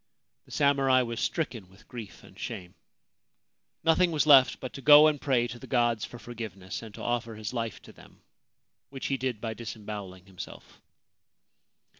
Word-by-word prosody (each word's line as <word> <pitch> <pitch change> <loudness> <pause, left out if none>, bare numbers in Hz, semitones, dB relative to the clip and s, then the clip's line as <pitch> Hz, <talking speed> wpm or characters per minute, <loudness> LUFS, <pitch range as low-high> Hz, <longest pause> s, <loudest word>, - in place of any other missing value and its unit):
The - - -19
samurai 135 -3 +3
was 115 -1 -4
stricken 120 - -2
with 95 - -20
grief 115 -6 -9
and - - -16
shame. 90 -1 -6 1.1
Nothing 170 +2 +4
was 155 -2 +1
left 135 -4 +6
but 130 - -7
to 135 - -8
go 150 +2 +9
and 150 -2 +2
pray 130 -4 +2
to 120 0 -8
the - - -11
gods 120 -4 +1
for 120 - -10
forgiveness, 110 -6 -7
and 110 -2 -10
to - - -8
offer 120 -2 -2
his 105 +1 -6
life 115 -3 -3
to - - -14
them, - - -18 0.7
which 135 -1 -7
he 135 - 0
did 125 -3 -2
by 110 0 -4
disembowelling 105 -5 -8
himself. 95 -2 -11
120 Hz, 170 wpm, -28 LUFS, 110-135 Hz, 1.1 s, go